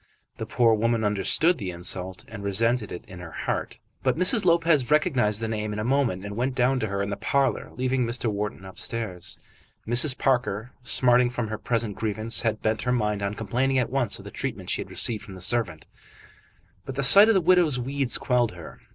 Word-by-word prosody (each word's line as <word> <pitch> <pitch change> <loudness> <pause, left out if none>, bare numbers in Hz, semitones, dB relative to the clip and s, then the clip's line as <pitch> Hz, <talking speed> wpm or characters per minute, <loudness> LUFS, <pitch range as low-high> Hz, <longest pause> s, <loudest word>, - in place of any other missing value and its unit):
The - - -6
poor 115 -2 +3
woman 115 +1 0
understood 105 - +1
the 95 -4 -4
insult 90 +1 -1
and 105 -2 -9
resented 110 +3 0
it 90 - -8
in 90 -1 -11
her 90 -1 -9 0.2
heart. - - -3 0.2
But - - 0
Mrs. 185 +4 +4
Lopez 165 -7 +2
recognised 130 - +1
the 110 - -2
name 105 -1 -3
in - - -5
a 105 - -2
moment, 120 -7 0
and 100 0 -6
went 125 +3 -2
down 130 +1 +2
to 110 - -2
her 100 0 -2
in 100 - -4
the - - -2
parlour, 135 +6 -1
leaving 130 0 0
Mr. 120 +1 -3
Wharton 105 -3 -3
upstairs. 95 -3 -4 0.5
Mrs. 125 +4 +4
Parker, 125 -3 -1
smarting 125 0 +4
from 120 -3 -4
her 110 - -5
present 115 -4 -1
grievance, 110 +1 0
had 110 -2 -2
bent 110 0 0
her 125 - -1
mind 105 -4 -1
on 100 +1 -3
complaining 125 +6 -1
at 125 -2 0
once 125 -6 +1
of - - -13
the - - -9
treatment - - -5
she - - -1
had - - -9
received 110 -3 -1
from 100 -3 -11
the - - -10
servant, 90 -5 -2 1.0
but 135 - -7
the 140 - -1
sight 200 +10 +9
of 225 - +3
the - - +5
widow's 175 -5 +3
weeds 135 +1 0
quelled 120 -5 0
her. 85 -2 -12
115 Hz, 210 wpm, -25 LUFS, 105-130 Hz, 1.0 s, sight